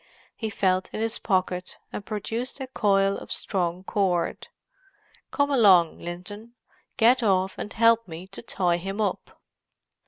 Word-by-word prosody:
He 220 - -3
felt 185 -2 +1
in - - -4
his 225 +1 -1
pocket, 185 -2 -1 0.2
and - - -5
produced 225 +6 -4
a 265 - -3
coil 200 -6 +2
of - - -11
strong 180 -2 -2
cord. 185 -4 0 0.8
"Come 285 0 +1
along, 190 - +5
Linton—get 220 +6 -2
off 190 -3 +2
and 210 - -6
help 230 0 +4
me 165 +1 -8
to - - -7
tie 180 -6 0
him 195 +4 -5
up." 205 -4 -3
200 Hz, 135 wpm, -26 LUFS, 185-225 Hz, 0.8 s, along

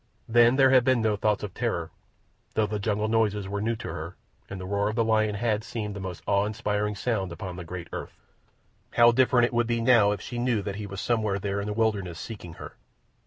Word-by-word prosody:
Then 120 +2 +5
there 135 -1 +5
had 130 -2 +6
been 130 -1 +3
no 110 -1 +2
thoughts 105 0 0
of 100 -3 -5
terror, - - -2 0.6
though 110 - +3
the 105 0 -3
jungle 105 +1 0
noises 105 -3 +1
were 100 +1 -3
new 115 +2 0
to - - -7
her, 85 +3 -6 0.3
and 100 - -6
the 90 - -6
roar 100 +2 0
of 110 - -4
a 115 - +3
lion 110 -1 +2
had 110 0 0
seemed 105 -3 -5
the - - -5
most 95 -3 -6
awe 100 0 +2
inspiring 105 -1 -1
sound 100 -4 -1
upon 90 +2 -6
the 90 - -7
great 85 0 -7
earth. - - -6 0.8
How 120 0 +7
different 125 0 +3
would 120 0 +2
it 120 - +1
be - - -1
now 115 -3 +5
if 105 - -2
she 120 +4 -6
knew 120 -4 +1
that 100 -1 -4
he 105 -1 -5
was 100 0 -6
somewhere 110 -4 0
there 100 0 -2
in 100 - -5
the 105 - -2
wilderness, 100 -6 -1
seeking 95 -7 -8
her! - - -9
105 Hz, 235 wpm, -27 LUFS, 100-115 Hz, 0.8 s, How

